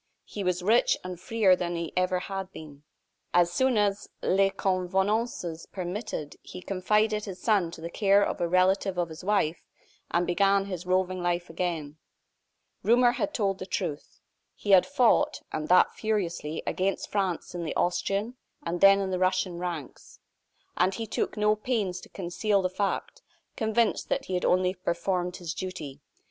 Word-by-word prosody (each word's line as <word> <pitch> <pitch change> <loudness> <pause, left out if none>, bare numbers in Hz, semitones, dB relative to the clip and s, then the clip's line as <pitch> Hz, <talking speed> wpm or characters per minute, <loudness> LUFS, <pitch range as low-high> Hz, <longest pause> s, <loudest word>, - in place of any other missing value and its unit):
He 205 - -6
was 180 -1 0
free 220 +6 +5 0.2
and 185 - -5 0.2
richer 215 -5 +5
than 175 -1 -3
he 170 -1 -4
had 185 - +3
ever 190 +1 -3
been. 150 -4 -11 0.5
As 175 -1 +4
soon 260 -3 +2
as 205 -1 0
les 195 +1 +3
convenances 190 -1 -1
permitted, 180 -4 -5
he 180 - -10
confided 210 +3 +1
his 190 -3 -7
son 205 -7 +2
to 165 - -10
the 170 - -5
care 200 +1 +4
of - - -3
a 170 - +2
relative 185 +2 +2
of 175 -1 0
his 160 +2 -10
wife, 180 -5 +1 0.5
and 175 +1 +1
began 195 +2 +3
his 180 -2 -6
roving 185 0 +1
life 175 -1 -1
again. 165 -4 -3 0.8
Rumor 240 +2 +5
had 260 +4 -2
told 200 -7 -1
the 185 - -6
truth. 165 -7 -4 0.4
He 205 - -2
had 190 -2 +7
fought, 285 +2 +3
and 155 0 -3
that 180 +2 +5
furiously, 175 -8 -2
against 195 +1 -1
France 190 -5 -1
in 175 -1 -4
the 155 - -4
Austrian, 200 +7 0 0.3
and 170 +1 -3
then 195 0 +7
in 190 -1 -2
the 185 - -1
Russian 185 -1 0
ranks. 170 -6 -6 0.6
And 185 +2 +2
he 225 - -4
took 220 - -2
no 210 0 +3
pains 210 -5 -2
to - - -14
conceal 195 +2 0
the 185 - 0
fact; 200 - -2 0.3
convinced 220 +1 +1
that - - -1
he 190 - -5
had 180 - 0
only 185 0 +3
performed 180 0 -2
his 170 -3 -5
duty. 150 -7 -6
185 Hz, 170 wpm, -27 LUFS, 175-205 Hz, 0.8 s, had